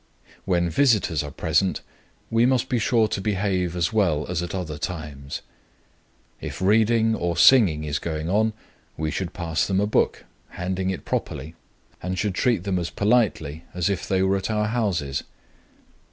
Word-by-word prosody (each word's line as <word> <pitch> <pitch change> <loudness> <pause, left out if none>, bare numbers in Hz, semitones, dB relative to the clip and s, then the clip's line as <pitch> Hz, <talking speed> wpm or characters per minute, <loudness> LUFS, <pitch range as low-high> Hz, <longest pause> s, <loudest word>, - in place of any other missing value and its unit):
When 85 -2 +2
visitors 105 - +2
are 75 - -5
present, 80 +6 0 0.5
we 115 +2 +4
must 130 0 +1
be 125 - +1
sure 115 -1 +3
to 100 - -2
behave 95 -3 0
as 85 +4 0
well 85 -9 +2
as 90 -1 -1
at 85 +1 -4
other 80 -5 -4
times. 75 -5 -5 1.0
If - - -6
reading 110 +3 +3
or 85 -5 -1
singing 90 - +6
is 75 -1 -2
going 80 -1 -3
on, 110 +4 +2 0.4
we 80 -1 -2
should 90 +2 -3
pass 85 -2 -1
them 95 -1 +1
a 100 - +2
book, 105 - 0 0.3
handing 95 +1 -2
it 95 - -4
properly, 80 - -3 0.5
and 90 +1 -3
should 105 -1 0
treat 120 +4 +1
them 95 -3 0
as 85 - -3
politely 100 -9 +1
as 90 +2 +1
if 95 - -3
they 95 -1 +2
were 95 +1 +2
at 95 - -4
our 105 -1 0
houses. 90 - -1
95 Hz, 165 wpm, -24 LUFS, 80-110 Hz, 1.0 s, singing